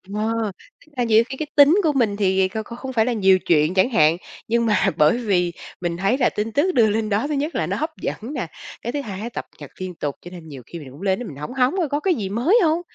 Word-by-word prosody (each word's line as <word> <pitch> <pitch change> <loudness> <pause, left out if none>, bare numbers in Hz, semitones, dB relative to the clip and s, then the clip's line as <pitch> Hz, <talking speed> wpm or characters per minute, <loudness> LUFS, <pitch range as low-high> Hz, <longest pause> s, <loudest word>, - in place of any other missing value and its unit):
ờ, 220 0 -1 0.3
tức 310 - -26
là 245 - +1
nhiều 225 0 +4
khi 265 - -6
cái 310 - -4
tính 290 +3 +7
của 305 -2 +2
mình 220 -6 +1
thì 190 -1 +2
kh 215 - -7
kh 235 - -8
không 260 0 -6
phải 220 -2 +3
là 250 - 0
nhiều 190 -4 +4
chuyện 155 0 +2
chẳng 190 +7 +3
hạn. 160 -6 +4 0.3
Nhưng 235 +1 +1
mà 210 -3 +2
bởi 155 +8 +4
vì 180 -7 0 0.3
mình 170 -1 -2
thấy 195 +8 +1
là 255 - +3
tin 215 +2 -3
tức 345 +6 +2
đưa 220 -3 +5
lên 215 +1 -1
đó, 215 +8 0
thứ 300 - -2
nhất 295 +4 -2
là - - 0
nó - - -2
hấp 310 +1 -1
dẫn - - -2 0.2
nè, 245 -10 -3 0.3
cái 235 - -3
thứ 290 - -1
hai 215 -2 -6
cập - - -6
nhật - - -10
liên 185 -2 -5
tục, 145 -3 -3
cho 175 - -11
nên 170 -3 -10
nhiều 135 -3 -9
khi 170 - -8
mình 140 -4 -11
cũng 140 +6 -13
lên 195 0 0
mình 140 - -9
hóng 150 - -6
hóng 260 +4 +2
coi 330 -6 0
có 290 - 0
cái 365 +1 +1
gì 200 -5 -4
mới 270 - +3
hông? 330 +1 +2
220 Hz, 285 wpm, -22 LUFS, 185-260 Hz, 0.3 s, tính